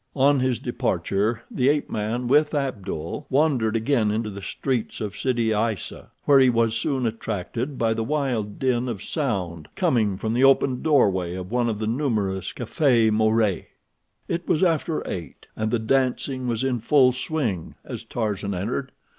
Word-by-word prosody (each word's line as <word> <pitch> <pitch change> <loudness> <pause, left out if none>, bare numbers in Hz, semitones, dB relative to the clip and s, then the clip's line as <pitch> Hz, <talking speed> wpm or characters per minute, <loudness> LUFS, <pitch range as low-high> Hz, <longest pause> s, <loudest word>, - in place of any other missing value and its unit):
On 140 0 +4
his 130 -2 +1
departure 105 +4 -1
the 130 +1 +2
ape 145 0 +1
man, 110 +4 -2
with 150 +4 +3
Abdul, 105 - -3
wandered 130 -6 +2
again 115 -1 +2
into 110 0 -1
the 100 0 -8
streets 125 +4 -3
of 105 -2 -4
Sidi 115 0 0
Aissa, 105 -3 -2 0.2
where 140 -1 +6
he 130 -1 +6
was 115 -1 +2
soon 130 +2 0
attracted 115 +4 -3
by 115 -1 +2
the 115 - -2
wild 125 -6 -1
din 125 -1 0
of 105 -6 -5
sound 95 - -2
coming 105 -6 +1
from 110 +2 -2
the 125 +3 +2
open 135 -1 +4
doorway 95 - +2
of 95 +1 -6
one 120 -1 +1
of 110 - -2
the 110 - -3
numerous 110 -6 -1
cafés 120 -2 +2
maures. 110 -2 +2 0.6
It 170 +1 -3
was 165 - +2
after 165 -2 0
eight, 85 -3 -6
and 110 0 -1
the 120 - +1
dancing 130 +2 0
was 115 0 -1
in 130 -2 0
full 130 +2 +4
swing 125 - -3
as - - -6
Tarzan 100 -4 -2
entered. 120 +8 -3
115 Hz, 165 wpm, -24 LUFS, 105-135 Hz, 0.6 s, where